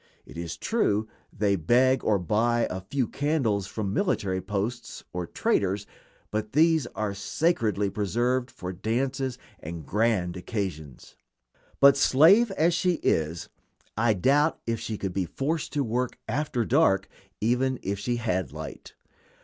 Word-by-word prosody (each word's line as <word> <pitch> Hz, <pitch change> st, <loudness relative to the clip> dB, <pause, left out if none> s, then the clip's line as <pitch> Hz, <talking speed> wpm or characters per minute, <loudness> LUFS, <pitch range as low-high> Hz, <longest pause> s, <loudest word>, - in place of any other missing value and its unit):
It -, -, -13 dB
is 85 Hz, 0 st, -5 dB
true 110 Hz, -, 0 dB, 0.2 s
they 100 Hz, -1 st, +1 dB
beg 125 Hz, +10 st, +3 dB
or 105 Hz, -, +3 dB
buy 115 Hz, +6 st, +1 dB
a 95 Hz, -, -4 dB
few 125 Hz, +6 st, -1 dB
candles 130 Hz, -10 st, 0 dB
from 100 Hz, -3 st, -3 dB
military 100 Hz, -, 0 dB
posts 105 Hz, +5 st, -4 dB
or 90 Hz, -1 st, -3 dB
traders, 100 Hz, +1 st, 0 dB, 0.5 s
but 110 Hz, 0 st, -3 dB
these 160 Hz, -2 st, +4 dB
are 105 Hz, 0 st, -2 dB
sacredly 105 Hz, -, 0 dB
preserved 120 Hz, +6 st, 0 dB
for 90 Hz, -4 st, -7 dB
dances 130 Hz, +6 st, -2 dB, 0.2 s
and 80 Hz, 0 st, -7 dB
grand 105 Hz, -5 st, +1 dB
occasions. 90 Hz, -, -5 dB, 0.7 s
But, 140 Hz, 0 st, +7 dB
slave 170 Hz, -, +6 dB
as 170 Hz, 0 st, +2 dB
she 180 Hz, +1 st, +2 dB
is, 80 Hz, +1 st, 0 dB, 0.5 s
I 110 Hz, 0 st, +2 dB
doubt 145 Hz, -, +2 dB
if 115 Hz, -1 st, -1 dB
she 110 Hz, -, -4 dB
could 95 Hz, -2 st, -4 dB
be 95 Hz, -1 st, 0 dB
forced 150 Hz, -, -2 dB
to 145 Hz, -2 st, +1 dB
work 125 Hz, +1 st, -2 dB
after 125 Hz, -1 st, -1 dB
dark 120 Hz, -8 st, +3 dB, 0.3 s
even 125 Hz, +4 st, +1 dB
if 100 Hz, +1 st, -2 dB
she 120 Hz, +4 st, -1 dB
had 95 Hz, -, -1 dB
light. 80 Hz, +1 st, -9 dB
110 Hz, 140 wpm, -27 LUFS, 95-135 Hz, 0.7 s, But